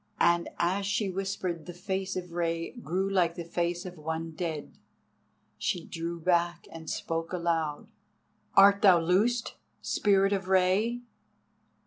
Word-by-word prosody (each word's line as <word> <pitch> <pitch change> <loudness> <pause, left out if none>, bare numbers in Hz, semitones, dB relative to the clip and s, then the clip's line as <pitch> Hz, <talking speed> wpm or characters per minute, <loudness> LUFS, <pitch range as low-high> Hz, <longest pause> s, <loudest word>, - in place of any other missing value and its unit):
And 170 0 +3
as 190 +3 0
she 205 -1 0
whispered 185 -3 -3
the 175 - -7
face 190 +1 -3
of 180 -1 -5
Rei 165 -1 -1
grew 195 -6 -2
like 180 -4 +2
the 170 - -6
face 175 +1 -2
of 180 -2 -8
one 160 +1 -4
dead. 160 -3 -5 0.8
She 175 -2 -1
drew 170 0 -5
back 170 0 +1
and 160 -1 -8
spoke 165 0 -3
aloud: 165 -4 -1 0.7
"Art 200 +1 +7
thou 185 -4 +7
loosed, 205 +8 +1 0.2
Spirit 195 -1 +2
of 195 -1 -2
Rei?" 190 +6 +2
175 Hz, 135 wpm, -29 LUFS, 170-195 Hz, 0.8 s, Art